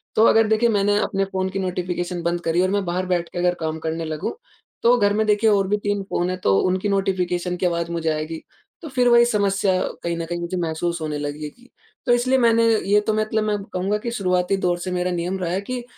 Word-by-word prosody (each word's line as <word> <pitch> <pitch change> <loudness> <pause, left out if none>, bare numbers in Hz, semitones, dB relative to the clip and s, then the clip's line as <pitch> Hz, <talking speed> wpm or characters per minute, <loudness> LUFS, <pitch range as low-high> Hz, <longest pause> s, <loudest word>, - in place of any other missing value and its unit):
तो 220 - +5
अगर 225 0 +4
देखिए, 220 +2 +3
मैंने 205 -1 +2
अपने 195 -1 -1
फ़ोन 190 -1 -2
की 195 +1 -4
नोटिफ़िकेशन 180 -1 -3
बंद 170 0 -1
करी 170 +1 +1
और 185 - +2
मैं 205 -1 +1
बाहर 180 +2 -1
बैठ 175 -2 -1
के - - -9
अगर 180 0 +2
काम 160 0 -3
करने 165 +1 -2
लगूँ, 155 -1 -3 0.5
तो 240 +1 +6
घर 205 -2 +2
में, 220 +1 +1
देखिए, 210 +1 +3
और 195 -2 +2
भी 210 +1 +1
तीन 205 -1 -1
फ़ोन 175 +1 0
हैं, 185 - -2
तो 100 - +2
उनकी 185 +3 0
नोटिफ़िकेशन 180 -2 0
की 185 - -1
आवाज़ 170 -1 -1
मुझे 165 -1 -1
आएगी। 155 +1 -3 0.4
तो 320 - -7
फिर 250 -2 +2
वही 235 0 +6
समस्या 200 -4 +1 0.2
कहीं 170 0 -1
न 165 - -3
कहीं 175 +1 -4
मुझे 170 +2 -3
महसूस 170 0 -2
होने 150 -1 -3
लगेगी। 150 - -7 0.4
तो 245 - +2
इसलिए 255 +2 +2
मैंने 230 -2 +4 0.3
ये 205 +1 +5
तो 215 - +2
मतलब 215 0 0
मैं 210 -1 0 0.2
कहूँगा 190 +3 0
कि 235 +3 -5
शुरुआती 185 -3 0
दौर 175 -1 +2
से 185 +1 -4
मेरा 180 0 -1
नियम 175 +2 -2
रहा 175 -2 -2
है 190 +2 -1
कि 250 +4 -5
185 Hz, 235 wpm, -22 LUFS, 175-210 Hz, 0.5 s, तो